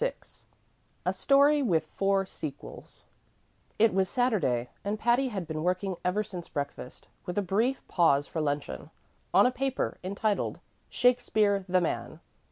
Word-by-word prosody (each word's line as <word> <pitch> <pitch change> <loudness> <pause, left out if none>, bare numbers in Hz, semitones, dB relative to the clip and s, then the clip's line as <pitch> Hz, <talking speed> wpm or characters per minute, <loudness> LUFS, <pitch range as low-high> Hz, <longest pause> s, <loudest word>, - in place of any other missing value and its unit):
VI - - +1 0.9
A - - +1
Story 285 +1 +4
with 170 - +1
Four 195 +3 0
Sequels 155 -6 -9 0.7
It 220 -2 +4
was 190 -1 +1
Saturday, 180 - 0
and 205 +2 -2
Patty 240 +4 +2
had 195 -7 -4
been 155 -1 -4
working 185 +2 -1
ever 185 +4 +1
since 180 -5 -8
breakfast, 140 -3 -6 0.2
with 180 - -4
a 205 - +2
brief 225 +8 0
pause 145 -5 +3
for 160 - -4
luncheon, 145 -1 -3 0.4
on - - +6
a 250 - +3
paper 270 +1 -2
entitled 200 +2 -1 0.3
"Shakspere, 215 -5 +2
the 185 0 +3
Man." 170 - -3
195 Hz, 145 wpm, -28 LUFS, 170-240 Hz, 0.9 s, on